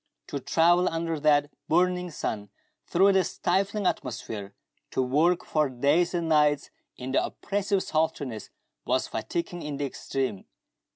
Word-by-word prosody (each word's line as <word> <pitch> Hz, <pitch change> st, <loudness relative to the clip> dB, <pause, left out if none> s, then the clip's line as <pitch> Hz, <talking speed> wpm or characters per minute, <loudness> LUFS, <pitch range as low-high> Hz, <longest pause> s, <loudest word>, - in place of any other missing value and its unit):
To 140 Hz, -, -3 dB
travel 175 Hz, +5 st, +3 dB
under 165 Hz, -1 st, -2 dB
that 145 Hz, -1 st, +3 dB, 0.2 s
burning 180 Hz, +2 st, +2 dB
sun 105 Hz, -9 st, -4 dB, 0.4 s
through 195 Hz, +3 st, +4 dB
the 190 Hz, -1 st, +4 dB
stifling 195 Hz, +4 st, 0 dB
atmosphere, 110 Hz, -, -3 dB, 0.3 s
to -, -, 0 dB
work 160 Hz, +8 st, +2 dB
for 150 Hz, -3 st, +1 dB
days 145 Hz, +8 st, +2 dB
and 170 Hz, -1 st, -1 dB
nights 150 Hz, -2 st, +3 dB, 0.3 s
in 130 Hz, +1 st, -5 dB
the -, -, +3 dB
oppressive 200 Hz, -1 st, -1 dB
sultriness, 150 Hz, -8 st, -2 dB, 0.3 s
was 130 Hz, +1 st, 0 dB
fatiguing 175 Hz, 0 st, -3 dB
in 150 Hz, -2 st, -4 dB
the 145 Hz, -, -1 dB
extreme. 130 Hz, -6 st, -3 dB
155 Hz, 135 wpm, -27 LUFS, 135-175 Hz, 0.4 s, through